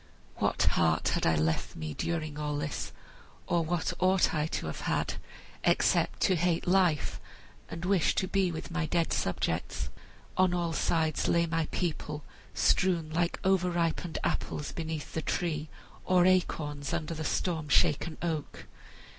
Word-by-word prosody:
"What - - +1
heart 80 -1 +2
had - - +1
I 80 - +4
left 80 +1 0
me, 80 -1 -5
during 155 - -3
all 150 -1 -1
this, 145 0 -3 0.5
or 170 -1 +1
what 170 +1 -1
ought 185 0 +3
I 155 -1 +1
to - - -3
have 80 - -4
had, - - 0 0.5
except - - +2
to 185 - +4
hate 170 0 +1
life 180 -5 +2 0.5
and 165 +1 -5
wish 190 -2 +3
to 185 - 0
be 190 -2 +1
with 160 +2 -6
my 165 -2 -1
dead 170 +1 +1
subjects? 90 - -1 0.5
On 185 -1 +4
all 170 -2 -1
sides 160 -1 +1
lay 170 0 +3
my 165 -1 -1
people 150 -4 -3 0.3
strewn 170 -4 +2
like 170 +2 0
over 190 -1 +3
ripened 170 -1 -1
apples 145 - -2
beneath 160 -2 -5
the 160 - -1
tree, 155 -2 -2 0.3
or 180 -1 +4
acorns 150 -6 +1
under 170 -1 -2
the 160 -1 -4
storm 160 -1 -1
shaken 155 +3 +3
oak. 160 -4 -3
165 Hz, 155 wpm, -30 LUFS, 150-175 Hz, 0.5 s, I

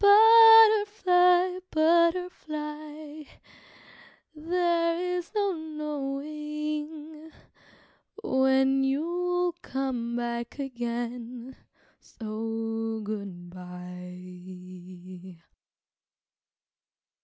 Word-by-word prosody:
Butterfly, 415 -4 +6
butterfly, 310 -2 -1 1.1
there 335 +1 0 0.2
is 350 -1 -5
no 405 -2 +1
knowing 300 0 -6 0.9
When 265 -3 +2
you'll 350 +6 -1
come 250 -3 -3
back 235 +1 -4
again, 240 -1 -5 0.4
so 225 0 -5
good 200 -4 -7
bye! 180 0 -11
290 Hz, 50 wpm, -27 LUFS, 225-335 Hz, 1.1 s, Butterfly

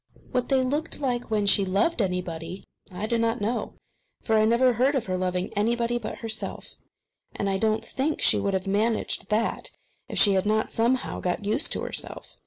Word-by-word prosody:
What 250 -1 -1
they 265 -1 +3
looked 295 +5 -1
like 245 -4 -1
when 210 -2 +1
she 200 0 +4
loved 200 - +1
anybody, 180 -1 -3 0.3
I 185 +3 -4
do 230 +1 0
not 230 +1 +1
know; 220 +4 -2 0.5
for 220 - +1
I 215 0 +5
never 240 +3 +4
heard 260 +5 +2
of 260 - 0
her 185 - -2
loving 185 0 -2
anybody 235 +3 +1
but 215 - -6
herself, 220 -1 -5 0.6
and 200 - -2
I 195 -1 0
do 220 - +3
not 215 +1 -1
think 295 +4 -1
she - - +4
could 200 -1 0
have 190 0 -2
managed 215 +4 0
that 220 +2 0 0.4
if - - -4
she 200 - +6
had 190 +1 +1
not 215 +1 +1
somehow 240 +3 0
got 180 +3 -2
used 215 +9 +2
to - - -2
herself. - - -5
220 Hz, 195 wpm, -26 LUFS, 195-240 Hz, 0.6 s, she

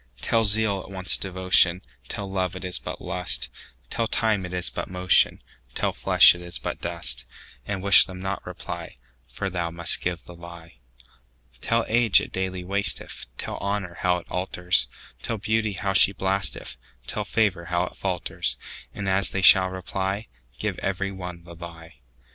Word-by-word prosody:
Tell 115 - +1
zeal 100 -1 +2
it - - -13
wants 95 -2 +1
devotion; 95 -1 +2 0.2
Tell 100 - -5
love 95 -2 -2
it 95 - -7
is 90 -1 -1
but - - -7
lust; 90 -1 0 0.4
Tell 115 - -1
time 110 -5 0
it - - -11
is 90 -1 -1
but - - -5
motion; 90 -1 +3 0.3
Tell - - 0
flesh - - +7
it 90 - -10
is 90 0 -5
but - - -5
dust:And 95 +11 -4
wish 100 0 +8
them 90 -1 -9
not 95 +1 -4
reply, - - -8 0.3
For 65 +11 -5
thou 85 -3 -2
must 85 0 +3
give 90 -1 -3
the 90 - -12
lie. 85 -4 -13 0.8
Tell 115 0 +1
age 115 -2 +5
it - - -6
daily 95 -1 -3
wasteth; 100 +2 -2
Tell - - -4
honour 100 -3 -3
how 90 -1 +2
it 85 - -10
alters; 90 -1 +1 0.3
Tell 115 - -3
beauty 110 +1 0
how 95 +1 -2
she 100 0 +5
blasteth; 95 -2 -2 0.3
Tell - - -3
favour 100 -6 0
how 90 +1 0
it - - -10
falters:And 95 -2 -4
as 95 +1 +2
they 95 - -3
shall 95 -1 +8
reply, 95 +3 -4 0.3
Give - - -3
every 100 0 -2
one 90 -3 -8
the 85 0 -12
lie. 85 -3 -11
95 Hz, 165 wpm, -24 LUFS, 90-100 Hz, 0.8 s, wish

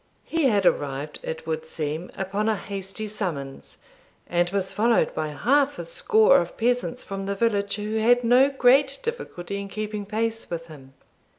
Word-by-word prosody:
He 330 -3 0
had 205 -7 +3
arrived, 145 -1 0
it 160 0 -6
would 160 0 -2
seem, 155 +2 -4
upon 200 +3 -1
a 220 - +2
hasty 195 +1 -5
summons, 175 -11 -5 0.5
and 175 0 +1
was 195 0 -2
followed 230 +2 +2
by 155 - -2
half 275 - +2
a - - -5
score 485 -1 +4
of - - -7
peasants 245 +1 0
from 195 0 -5
the 200 - -1
village 200 -2 +1
who 215 +1 -3
had 245 +3 +4
no 250 +4 +5
great 270 +1 +4
difficulty 200 - -4
in 200 - -6
keeping 210 0 -5
pace 225 +1 -2
with 165 -1 -4
him. 135 -5 -14
205 Hz, 170 wpm, -25 LUFS, 175-245 Hz, 0.5 s, no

